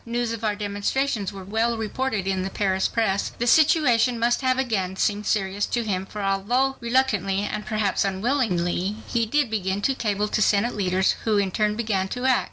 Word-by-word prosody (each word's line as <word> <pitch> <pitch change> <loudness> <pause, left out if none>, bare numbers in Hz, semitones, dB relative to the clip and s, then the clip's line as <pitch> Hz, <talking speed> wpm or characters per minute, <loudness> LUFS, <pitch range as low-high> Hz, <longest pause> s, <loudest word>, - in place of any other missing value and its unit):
News 235 0 -2
of 230 -1 -7
our 210 -1 0
demonstrations 205 +2 -1
were 195 -1 -9
well 225 +4 0
reported 220 -1 -2
in 190 -1 -1
the 190 - -3
Paris 190 -1 0
press. 210 -4 -1
The 240 - -1
situation 250 -5 +4
must 235 +2 +1
have 255 -1 +1
again 205 -8 -1
seemed 205 +1 -1
serious 200 -1 0
to 240 - -1
him, 190 -3 -2
for 210 0 -6
although 235 +8 +1
reluctantly 235 -6 +1
and 210 0 -4
perhaps 215 -2 0
unwillingly, 195 -3 0
he 230 -2 0
did 285 0 +1
begin 195 -2 -1
to 270 - +2
cable 210 -4 -1
to 215 - 0
Senate 210 +3 +2
leaders, 190 -1 +2
who 215 -2 +1
in 195 -2 +1
turn 210 +1 0
began 210 -4 -1
to 245 +6 -4
act. 260 -2 +4
210 Hz, 190 wpm, -24 LUFS, 195-240 Hz, -, situation